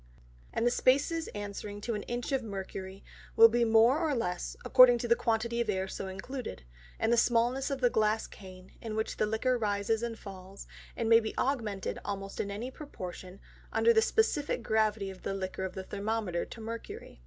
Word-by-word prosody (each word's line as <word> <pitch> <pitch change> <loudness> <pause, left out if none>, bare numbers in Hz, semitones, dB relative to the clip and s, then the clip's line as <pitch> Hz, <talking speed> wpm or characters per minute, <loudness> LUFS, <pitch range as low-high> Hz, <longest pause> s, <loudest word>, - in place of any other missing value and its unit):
And 230 - -1
the 240 - +4
Spaces 285 +7 +2
answering 205 0 -6
to 235 - -2
an 210 - -3
Inch 240 +2 -3
of 270 -1 +1
Mercury, 195 -2 -7 0.3
will 230 0 +9
be 240 +1 +2
more 230 +5 +5
or 315 -4 0
less, 180 -7 -3
according 255 -2 +8
to 240 - -3
the 235 - +5
quantity 235 +1 0
of 230 - -2
Air 190 -1 0
so 195 - -5
included, 190 - -6 0.3
and 230 - +2
the - - +3
smallness 240 +4 +2
of 275 -1 -3
the 245 - +5
Glass 215 0 +1
Cane, 185 -1 -13
in 220 -2 -5
which 220 0 -2
the 215 - +1
Liquor 240 +3 0
rises 210 +1 0
and 235 -1 -3
falls, 195 -1 -10 0.3
and 230 - -1
may 230 0 +7
be 220 -1 -5
augmented 225 -8 -1
almost 195 -1 -5
in 200 - -1
any 220 +6 -5
proportion, 185 - -8 0.3
under - - +3
that 450 - +5
of - - +3
the 445 -1 +4
Specifick 290 - -2
Gravity 215 -3 +1
of 190 - -13
the 195 - -3
Liquor 190 0 -4
of 185 - -6
the 190 - -5
Thermometer 205 -3 -2
to - - -11
Mercury. 225 - -8
220 Hz, 200 wpm, -30 LUFS, 195-240 Hz, 0.3 s, will